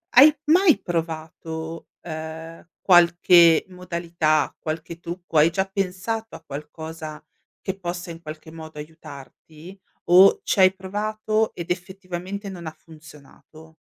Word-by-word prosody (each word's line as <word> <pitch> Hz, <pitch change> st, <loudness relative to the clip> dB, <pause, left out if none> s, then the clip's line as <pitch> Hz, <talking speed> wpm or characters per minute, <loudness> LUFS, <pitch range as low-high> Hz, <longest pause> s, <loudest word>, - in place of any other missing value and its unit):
Hai 290 Hz, +4 st, +9 dB
mai 335 Hz, +2 st, +5 dB
provato, 160 Hz, -1 st, -5 dB
ehm, 160 Hz, +1 st, -8 dB
qualche 175 Hz, -2 st, +6 dB
modalità, 170 Hz, -4 st, -1 dB
qualche 160 Hz, +1 st, -6 dB
trucco, 175 Hz, -1 st, -5 dB
hai 155 Hz, +3 st, +6 dB
già 190 Hz, +3 st, 0 dB
pensato 195 Hz, +4 st, -3 dB
a -, -, -12 dB
qualcosa 155 Hz, +1 st, -8 dB, 0.4 s
che 190 Hz, 0 st, -4 dB
possa 175 Hz, -2 st, -5 dB
in 165 Hz, 0 st, -10 dB
qualche 155 Hz, 0 st, -10 dB
modo 160 Hz, -2 st, -10 dB
aiutarti? 155 Hz, +3 st, -12 dB, 0.3 s
O 185 Hz, +3 st, +7 dB
c'hai 185 Hz, -1 st, +4 dB
provato 215 Hz, +3 st, -2 dB
ed 170 Hz, -1 st, -7 dB
effettivamente 185 Hz, +2 st, -5 dB
non 175 Hz, -3 st, -8 dB
ha 155 Hz, -, -4 dB
funzionato? 160 Hz, 0 st, -16 dB
170 Hz, 115 wpm, -23 LUFS, 160-190 Hz, 0.4 s, Hai